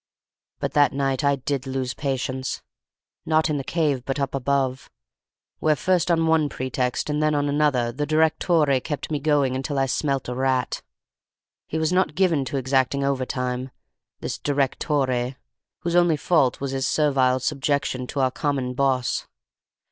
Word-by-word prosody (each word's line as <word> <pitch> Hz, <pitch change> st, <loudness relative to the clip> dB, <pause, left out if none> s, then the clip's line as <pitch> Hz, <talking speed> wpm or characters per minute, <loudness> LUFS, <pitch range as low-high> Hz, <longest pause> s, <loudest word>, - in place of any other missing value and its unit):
But -, -, -2 dB
that 145 Hz, -1 st, +4 dB
night 135 Hz, 0 st, 0 dB
I 140 Hz, 0 st, +3 dB
did 135 Hz, 0 st, -3 dB
lose 130 Hz, -1 st, -2 dB
patience: 130 Hz, -2 st, -3 dB, 0.6 s
not 155 Hz, -1 st, +2 dB
in 150 Hz, -, 0 dB
the 135 Hz, -, -3 dB
cave, 145 Hz, -5 st, 0 dB
but 135 Hz, +2 st, -3 dB
up 140 Hz, -1 st, -1 dB
above, 135 Hz, -1 st, -1 dB, 0.7 s
where 155 Hz, -1 st, +3 dB
first 180 Hz, +1 st, +1 dB
on 165 Hz, -1 st, +3 dB
one 160 Hz, -2 st, +3 dB
pretext 130 Hz, -1 st, -2 dB
and 150 Hz, 0 st, -1 dB
then 155 Hz, 0 st, +2 dB
on 145 Hz, 0 st, +1 dB
another 140 Hz, -5 st, +1 dB
the 145 Hz, +4 st, -3 dB
direttore 155 Hz, -2 st, +3 dB
kept 150 Hz, 0 st, -4 dB
me 150 Hz, -, 0 dB
going 140 Hz, -3 st, +2 dB
until 135 Hz, +2 st, -3 dB
I 135 Hz, -, +3 dB
smelt 135 Hz, +1 st, -1 dB
a 125 Hz, -, -3 dB
rat. 130 Hz, 0 st, 0 dB, 0.9 s
He 160 Hz, -, -3 dB
was 160 Hz, +2 st, +1 dB
not 185 Hz, -4 st, +1 dB
given 170 Hz, -7 st, +2 dB
to 135 Hz, +3 st, -3 dB
exacting 135 Hz, +1 st, +1 dB
overtime, 130 Hz, -1 st, -2 dB, 0.5 s
this -, -, -4 dB
direttore, 135 Hz, -2 st, 0 dB, 0.5 s
whose 170 Hz, 0 st, -1 dB
only 175 Hz, -3 st, +4 dB
fault 145 Hz, -5 st, +2 dB
was 140 Hz, -1 st, -3 dB
his 135 Hz, 0 st, -1 dB
servile 135 Hz, -4 st, +2 dB
subjection 135 Hz, -2 st, -1 dB
to 140 Hz, -, -2 dB
our 130 Hz, -1 st, +2 dB
common 135 Hz, -3 st, -1 dB
boss. 130 Hz, -2 st, 0 dB
140 Hz, 160 wpm, -24 LUFS, 130-150 Hz, 0.9 s, that